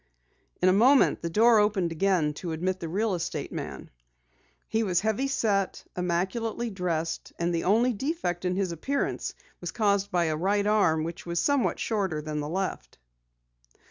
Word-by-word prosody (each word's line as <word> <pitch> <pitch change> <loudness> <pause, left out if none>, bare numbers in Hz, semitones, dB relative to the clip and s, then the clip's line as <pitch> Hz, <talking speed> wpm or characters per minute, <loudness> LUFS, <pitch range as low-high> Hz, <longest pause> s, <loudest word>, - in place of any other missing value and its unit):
In - - +6
a 185 - +6
moment 255 +7 +5
the 170 - -2
door 225 +5 +5
opened 200 -5 +1
again 165 -3 +1
to 170 -3 -3
admit 185 +3 -2
the 165 - -5
real 205 +4 0
estate 170 -2 -3
man. - - -6 0.8
He 225 - 0
was 180 -5 +1
heavy 220 +6 0
set, 205 -7 0
immaculately 190 +7 -1
dressed, 170 -4 -3
and 170 0 0
the 165 - -1
only 230 +6 +3
defect 230 - -2
in 180 0 0
his 190 -2 -1
appearance 270 - -2 0.2
was 175 - -5
caused 200 -1 +1
by 175 -3 +1
a 155 -1 0
right 200 +5 +1
arm 190 -7 +3
which 170 +2 -6
was 170 0 -1
somewhat 285 +2 +1
shorter 195 -8 -1
than 150 0 -4
the 145 0 -3
left. 180 - -3
190 Hz, 170 wpm, -27 LUFS, 170-215 Hz, 0.8 s, In